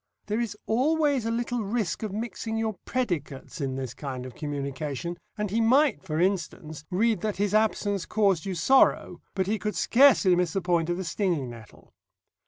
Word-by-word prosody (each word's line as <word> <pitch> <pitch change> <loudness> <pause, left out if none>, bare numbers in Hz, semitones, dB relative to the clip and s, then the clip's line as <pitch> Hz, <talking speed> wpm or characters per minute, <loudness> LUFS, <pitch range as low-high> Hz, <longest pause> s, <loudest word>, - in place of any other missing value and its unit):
There 210 +2 -1
is 230 -3 -3
always 280 0 +2
a - - 0
little 240 +1 -1
risk 210 -2 -2
of 215 -3 -3
mixing 225 +1 -4
your 220 -1 -1
predicates 170 - -3
in 135 -2 -2
this 130 -3 -4
kind 130 -2 -6
of 130 - -8
communication, 145 +2 -4 0.2
and 210 -2 -2
he 225 +2 +1
might, 270 +6 +4
for 160 -4 -3
instance, 170 -5 -1
read 210 +1 +1
that 210 -3 -2
his 205 0 0
Absence 210 -3 +1
caused 195 -7 +2
you 190 -2 -3
Sorrow, 260 +11 +3
but 190 -1 +1
he 210 +3 -1
could 210 +2 -3
scarcely 235 -8 +5
miss 175 -2 0
the 195 - +1
point 175 -2 +1
of 175 - 0
the 190 - -3
stinging 170 - -1
nettle. 115 -3 -14
195 Hz, 185 wpm, -27 LUFS, 160-225 Hz, 0.2 s, scarcely